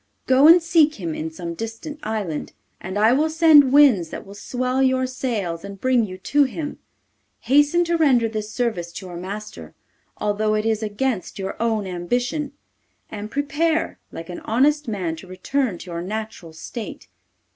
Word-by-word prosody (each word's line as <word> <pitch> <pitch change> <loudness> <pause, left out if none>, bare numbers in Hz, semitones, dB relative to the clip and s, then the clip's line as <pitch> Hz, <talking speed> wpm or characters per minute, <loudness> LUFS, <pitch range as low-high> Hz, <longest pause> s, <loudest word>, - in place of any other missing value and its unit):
Go 265 +3 +6
and 335 +2 +9
seek 320 -2 +4
him 170 -5 -4
in 160 +1 -4
some 170 +1 -6
distant 225 - -7
island, 210 -8 -4 0.3
and 190 +2 -5
I 220 +3 +5
will 305 +4 +2
send 310 -4 +6
winds 260 - +5
that - - -7
will 195 - -11
swell 255 +5 -2
your 260 -1 +2
sails 225 -10 -3
and 200 -1 -8
bring 255 -1 +2
you 185 -1 -8
to 285 +10 +2
him. 295 +3 -5 0.6
Hasten 290 +7 +4
to 340 0 0
render 260 -8 +4
this 215 -1 -4
service 215 -9 -2
to 190 - -8
your 180 -1 -8
master, 185 - -7 0.4
although 215 +1 0
it 215 0 -1
is 220 -1 +1
against 215 0 -2
your 195 -1 -4
own 220 -3 0
ambition, 245 - -2 0.6
and 210 0 -6
prepare, 295 +5 -1
like 165 +1 -8
an 175 - -6
honest 290 +5 +1
man, 185 -7 -2
to 185 - -11
return 195 +4 -2
to 180 - -10
your 170 0 -4
natural 210 -3 -6
state. 210 +8 -8
225 Hz, 170 wpm, -22 LUFS, 190-275 Hz, 0.6 s, and